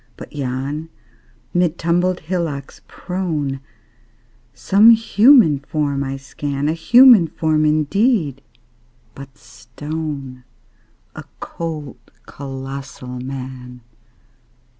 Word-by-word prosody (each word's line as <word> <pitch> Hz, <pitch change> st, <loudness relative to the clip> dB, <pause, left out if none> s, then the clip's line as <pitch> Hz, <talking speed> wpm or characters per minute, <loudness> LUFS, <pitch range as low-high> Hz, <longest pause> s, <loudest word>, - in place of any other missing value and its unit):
But -, -, -11 dB
yon, 140 Hz, +3 st, -4 dB, 0.6 s
mid 175 Hz, -2 st, +1 dB
tumbled 175 Hz, +2 st, 0 dB
hillocks 160 Hz, -5 st, -4 dB
prone, 160 Hz, -7 st, -4 dB, 0.9 s
Some 200 Hz, -, +4 dB
human 225 Hz, -, +5 dB
form 140 Hz, -1 st, -2 dB
I 135 Hz, 0 st, -4 dB
scan 140 Hz, +1 st, -4 dB
A 155 Hz, -, +1 dB
human 235 Hz, +2 st, +6 dB
form, 155 Hz, -1 st, 0 dB
indeed, 155 Hz, -, +1 dB, 0.7 s
but 135 Hz, -1 st, -12 dB
stone: 135 Hz, +1 st, -7 dB, 0.7 s
A -, -, -8 dB, 0.2 s
cold, 155 Hz, -6 st, -6 dB, 0.3 s
colossal 135 Hz, -2 st, -8 dB
Man! 125 Hz, -1 st, -8 dB
150 Hz, 85 wpm, -19 LUFS, 135-170 Hz, 0.9 s, human